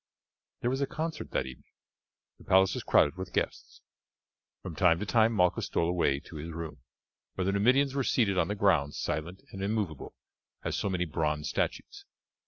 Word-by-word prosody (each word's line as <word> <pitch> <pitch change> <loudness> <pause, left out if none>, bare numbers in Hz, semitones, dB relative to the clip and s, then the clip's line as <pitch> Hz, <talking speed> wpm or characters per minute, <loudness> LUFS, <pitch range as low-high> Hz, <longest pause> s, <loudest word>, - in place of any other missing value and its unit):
There 120 - +1
was 135 +1 -1
a 140 - +1
concert 160 -1 -4
that - - -1
evening; 65 -1 -12 0.7
the - - -15
palace 95 0 +4
was - - -3
crowded 75 +5 +3
with 95 -1 -6
guests. - - -3 0.8
From 85 - -6
time 90 -2 +4
to 105 - -3
time 110 +1 +4
Malchus 90 -5 +2
stole 85 - 0
away 85 -6 +1
to 80 - -11
his 80 +3 -6
room, 80 -3 -6 0.6
where 95 - -1
the 95 - +2
Numidians 130 +7 +3
were 135 -1 0
seated 110 -6 +2
on 85 -3 +2
the 105 - -2
ground 85 -8 +2
silent 85 +5 -3
and 95 0 -6
immovable 100 -7 -2 0.5
as - - -2
so 100 - -1
many 90 -2 0
bronze 75 -1 -1
statues. - - -3
95 Hz, 185 wpm, -30 LUFS, 80-105 Hz, 0.8 s, palace